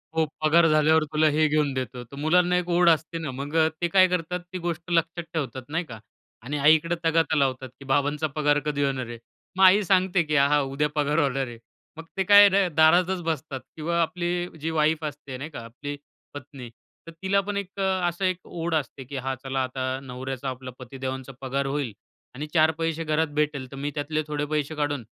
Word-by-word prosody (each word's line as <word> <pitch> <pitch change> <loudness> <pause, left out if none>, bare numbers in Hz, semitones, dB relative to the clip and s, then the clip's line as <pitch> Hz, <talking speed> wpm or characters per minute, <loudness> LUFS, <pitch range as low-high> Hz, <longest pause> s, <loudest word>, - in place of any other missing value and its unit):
हो, 160 -1 +3 0.2
पगार 165 +2 +5
झाल्यावर 155 +1 +4
तुला 155 +1 +4
हे 155 +1 +3
घेऊन 150 -2 +1
देतो 125 -1 -4
तर 120 +4 -13
मुलांना 175 +4 +3
एक 180 0 -2
ओढ 175 0 +4
असते 160 +1 +1
ना, 155 -4 -4
मग 140 +4 -6 0.3
ते 175 - +2
काय 185 +1 +5
करतात, 180 0 -2
ती 180 +1 -9
गोष्ट 170 0 -4
लक्षात 165 0 0
ठेवतात, 140 -4 -3
नाही 165 +4 -1
का 115 -6 -10 0.4
आणि 145 +5 -3
आईकडे 155 +4 +4
तगाता 160 -1 +2
लावतात 130 -2 0
की 140 - -12
बाबांचा 145 +3 +1
पगार 145 -1 +2
कधी 145 -1 0
होणार 135 -2 -1
आहे? 120 0 -7 0.4
मग 190 - +4
आई 190 +3 +7
सांगते 185 -1 +2
की 150 -1 -2
हा, 140 0 +5
हा, 150 +1 +3
उद्या 140 +2 -1
पगार 150 +1 +1
होणार 135 -3 0
आहे. 120 -1 -9 0.4
मग 165 - -7
ते 190 - +2
काय 205 +1 +8
र 195 -1 +3
दारातच 175 +4 +4
बसतात 155 -4 -3 0.2
किंवा 170 +2 0
आपली 175 +1 -1
जी 160 - -2
वाईफ 155 0 +1
असते, 145 -3 -6
नाही 145 +4 -6
का, 150 - -8
आपली 140 +5 -7 0.4
पत्नी 135 -3 -9 0.4
तर - - -7
तिला 190 +1 +2
पण 200 +1 -4
एक 200 0 -6
असं 190 -1 0
एक 185 -1 +1
ओढ 170 0 -4
असते 140 -2 -3
की 135 +3 -9
हा 135 0 -2
चला 135 0 -1
आता 130 +1 -3
नवऱ्याचा, 130 +1 -5
आपला 130 0 -7
पतीदेवांचा 130 +1 -6
पगार 135 +1 -2
होईल 135 -5 -2 0.4
आणि 150 +4 -5
4 160 -1 +5
पैसे 165 0 -1
घरात 160 +1 +1
भेटेल 150 -4 -1
तर - - -8
मी 140 +2 -3
त्यातले 155 +1 -1
थोडे 150 -1 -2
पैसे 150 0 -1
काढून 145 -3 -2
150 Hz, 205 wpm, -25 LUFS, 135-170 Hz, 0.4 s, काय